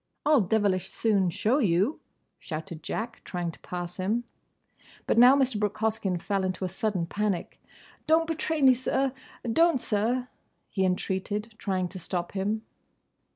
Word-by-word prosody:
"I'll 295 -4 +5
devilish 190 -2 +1
soon 200 -5 +2
show 220 - +1
you!" 200 - +2 0.4
shouted 160 0 -6
Jack, 230 +2 -4
trying 175 -2 -3
to - - -14
pass 175 0 -5
him. 210 +6 0 0.8
But - - +3
now 250 +3 +9
Mr. 260 -6 +1
Brooke 210 -1 -1
Hoskyn 215 -4 0
fell 195 +2 -1
into 185 0 -2
a - - -2
sudden 190 -1 -1
panic. 205 0 -2 0.5
"Don't 320 +1 +4
betray 320 -2 -1
me, 260 -1 +8
sir! 260 +1 0 0.4
Don't, 330 -2 +4
sir!" 235 +4 0 0.4
he 190 -2 +1
entreated, 195 +4 -2
trying 185 -2 -1
to 185 - -7
stop 175 0 -3
him. 205 +3 -1
205 Hz, 150 wpm, -28 LUFS, 185-240 Hz, 0.8 s, now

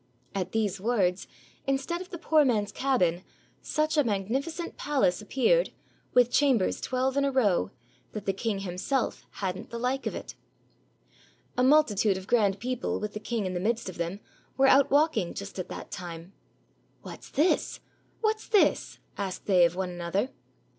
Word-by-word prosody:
At 185 -2 -2
these 205 -4 -1
words, 195 -5 +1 0.4
instead 275 +6 -1
of 370 - -9
the 345 - -6
poor 315 -2 +4
man's 210 -6 +1
cabin, 185 -10 +1 0.4
such 310 +1 0
a 295 - +5
magnificent 265 - -2
palace 265 -11 +1
appeared, 470 - +2 0.5
with 245 -1 +5
chambers 260 -10 +2
twelve 260 +1 0
in 280 - +3
a 280 - +1
row, 205 - +2 0.4
that 210 -2 -6
the 195 - +1
king 200 0 -2
himself 195 +8 -2 0.2
had 180 -1 -1
n't - - -9
the 235 - -5
like 255 +3 -1
of - - -3
it. - - -7 1.2
A 250 - +1
multitude 225 -8 +4
of 190 - -8
grand 205 -4 +2
people 250 +2 -2
with 210 0 -4
the 210 - -4
king 220 -1 -2
in 185 - -2
the 180 - -2
midst 220 +2 -1
of 180 - -10
them 175 +4 -3 0.4
were 270 - +5
out 270 +1 +6
walking 285 - +2
just 200 -1 -7
at 180 - -4
that - - -8
time. 175 0 -7 0.7
"What's - - -10
this? 305 +6 +1 0.4
what's 435 -1 0
this?" 420 -3 +2 0.2
asked 195 -2 -4
they 180 -3 +5
of 170 +1 0
one 185 -1 -2
another. 175 +8 -2
225 Hz, 170 wpm, -28 LUFS, 190-275 Hz, 1.2 s, out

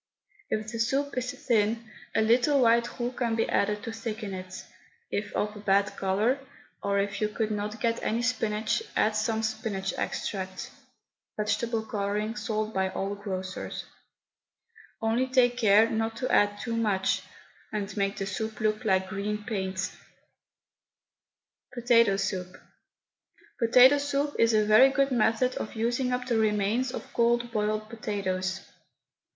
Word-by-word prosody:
If 215 0 -2
the 230 - -5
soup 275 +5 0
is 255 0 -2
thin, 230 -4 0 0.3
a 220 - +4
little 245 +6 +4
white 235 0 +3
roux 240 +1 -1
can 240 -3 -1
be 225 - +1
added 210 +1 0
to 230 - -4
thicken 220 -2 -5
it; 185 0 -7 0.5
if 205 +1 -2
of 210 0 -1
a - - -8
bad 200 0 +2
colour, 205 +8 +1 0.4
or 200 0 0
if 200 +1 -1
you 210 - +1
could 215 0 -2
not 210 +1 -3
get 230 +1 0
any 230 +2 -1
spinach, 220 - 0
add 215 0 +2
some 220 +1 0
spinach 200 -3 -2
extract 190 -2 -4 0.7
(vegetable 220 +2 -1
colouring, 210 -1 -2
sold 215 0 -2
by 190 0 +1
all 195 +1 -3
grocers), 190 -2 -5 1.2
only 230 +4 +1
take 250 -2 +3
care 220 -2 +5
not 225 0 -1
to 255 - -2
add 205 0 +3
too 230 +1 -3
much, 205 -4 +1 0.5
and 205 -2 -4
make 200 -1 -1
the 195 - -2
soup 220 +2 -4
look 215 +1 0
like 190 -3 +2
green 210 +2 -3
paint. 190 -3 -2 1.8
POTATO 230 -4 +4
SOUP. 185 -2 -3 1.0
Potato 250 +4 +7
soup 285 0 -1
is 230 -1 +4
a 215 -1 +3
very 215 +6 +7
good 275 0 +1
method 240 +1 +2
of 215 - -5
using 240 +3 0
up 250 0 -1
the 235 -3 +1
remains 215 +4 +1
of - - -8
cold 235 0 +2
boiled 215 -1 -1
potatoes. 190 -4 -3
220 Hz, 145 wpm, -28 LUFS, 205-235 Hz, 1.8 s, Potato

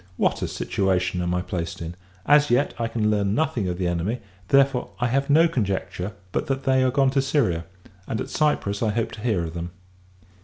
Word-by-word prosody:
What - - +1
a - - -1
situation 90 -2 0
am 90 0 0
I 90 - -1
placed 90 -2 -4
in! 85 0 -5 0.3
As 145 0 +5
yet, 125 +4 +2
I 115 - 0
can 110 -2 0
learn 100 -1 +1
nothing 120 -8 0
of 90 -1 -2
the 90 - -1
enemy: 90 +7 -1 0.3
therefore, 135 -1 +3
I 125 - +1
have 135 +3 0
no 160 +4 +6
conjecture 100 - -2 0.2
but - - -1
that 135 0 -1
they 130 -1 +3
are 130 - +3
gone 135 0 +3
to 135 0 +2
Syria; 135 - +1 0.4
and, 110 - -2
at - - -4
Cyprus, 125 -10 0
I 110 - +2
hope 110 +2 -1
to 110 - -9
hear 105 -7 +1
of 80 -1 -5
them. 85 0 -4
110 Hz, 215 wpm, -24 LUFS, 90-135 Hz, 0.4 s, no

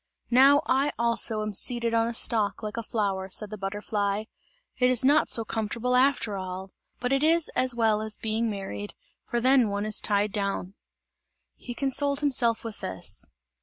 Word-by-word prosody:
"Now 275 +4 +6
I 275 +3 +1
also 230 -2 +1
am 215 0 -4
seated 235 +3 +1
on 230 0 +2
a 235 - -2
stalk 220 -2 +1
like 210 0 -5
a 230 - -3
flower," 200 -4 -2
said 210 +2 -3
the 215 - -6
butterfly, 205 +1 -2 0.6
"it 250 0 +4
is 255 0 +2
not 295 +3 +4
so 225 - +1
comfortable 230 +3 -2
after 255 -5 +2
all! 185 0 -6 0.3
But 250 +2 -1
it 275 +1 +1
is 330 +1 +4
as 255 -1 +2
well 220 -2 +2
as 215 -1 -2
being 225 +1 -1
married, 205 0 -6 0.3
for 240 - -2
then 255 -2 +3
one 200 +1 -2
is 215 0 +1
tied 205 0 0
down!" 200 -2 -3 0.8
He 245 - -8
consoled 280 +1 0
himself 245 -5 +2
with 225 -3 -7
this. 95 0 -4
225 Hz, 175 wpm, -26 LUFS, 205-250 Hz, 0.8 s, Now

